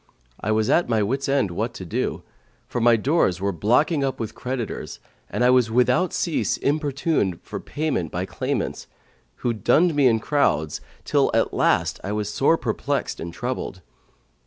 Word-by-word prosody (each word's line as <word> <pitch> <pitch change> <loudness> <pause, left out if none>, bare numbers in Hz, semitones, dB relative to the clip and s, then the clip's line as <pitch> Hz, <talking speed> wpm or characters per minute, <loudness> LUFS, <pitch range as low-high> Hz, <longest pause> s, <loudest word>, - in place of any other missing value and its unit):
I 105 - -4
was 110 0 +2
at 170 - +3
my 110 -2 +2
wits' 135 +6 -1
end 135 -9 +2
what 85 - -3
to - - -7
do, - - -2 0.4
for 120 - -3
my 120 0 +6
doors 115 - +1
were 100 +1 0
blocking 125 - +2
up 135 -2 -2
with 110 -1 -4
creditors 125 -3 -5 0.3
and - - -1
I 125 - +6
was 125 -3 +4
without 125 +9 +2
cease 170 - 0
importuned 140 - 0
for - - -6
payment 145 - -2
by 90 +2 -2
claimants, - - -3 0.6
who 120 - +2
dunned 160 +10 +3
me 145 -3 +4
in 115 -2 +3
crowds 80 - 0 0.2
till - - +2
at - - +1
last - - +1
I 100 - -3
was 105 -1 -2
sore 160 +4 +3
perplexed - - -2
and 85 - -5
troubled. 120 -4 -4
125 Hz, 170 wpm, -23 LUFS, 105-140 Hz, 0.6 s, my